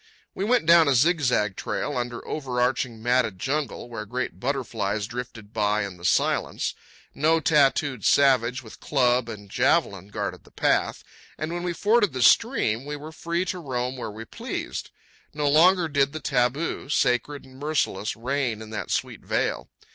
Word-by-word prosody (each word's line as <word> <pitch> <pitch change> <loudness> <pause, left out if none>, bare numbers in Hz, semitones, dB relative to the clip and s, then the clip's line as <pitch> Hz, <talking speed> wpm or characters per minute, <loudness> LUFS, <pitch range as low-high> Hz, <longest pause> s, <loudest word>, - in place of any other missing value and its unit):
We 190 - -3
went 240 -3 +2
down 170 -1 +7
a 140 - +3
zigzag 125 - +2
trail 145 - -3
under 120 -1 -4
overarching, 125 -4 -1
matted 120 -5 +1
jungle, 140 +4 -3
where 115 -3 -6
great 125 +3 -4
butterflies 115 -6 -2
drifted 115 -2 -8
by 105 -1 +1
in 95 -3 -8
the 85 - -10
silence. - - +1 0.4
No 160 +2 +2
tattooed 140 - +2
savage 130 -2 +3
with 110 - -13
club 125 -4 +1
and 105 -3 -8
javelin 95 0 +1
guarded 100 -2 -5
the - - -19
path; - - 0 0.3
and 155 +2 -3
when 175 - -3
we 175 0 -2
forded 205 - +2
the 130 -1 0
stream, 130 - +3
we 145 +1 -5
were 150 +2 -9
free 170 +3 -2
to 185 0 -3
roam 125 -4 -3
where 125 - -5
we 110 +2 -8
pleased. - - -5 0.5
No 150 -1 0
longer 170 +4 +5
did 140 -1 +1
the 155 - -4
taboo, 135 +2 -1
sacred 135 +1 0
and 130 0 -15
merciless, 145 -9 -1
reign 125 -1 -2
in 110 0 -10
that 110 - -5
sweet - - -2
vale. - - -1
130 Hz, 165 wpm, -25 LUFS, 115-150 Hz, 0.5 s, down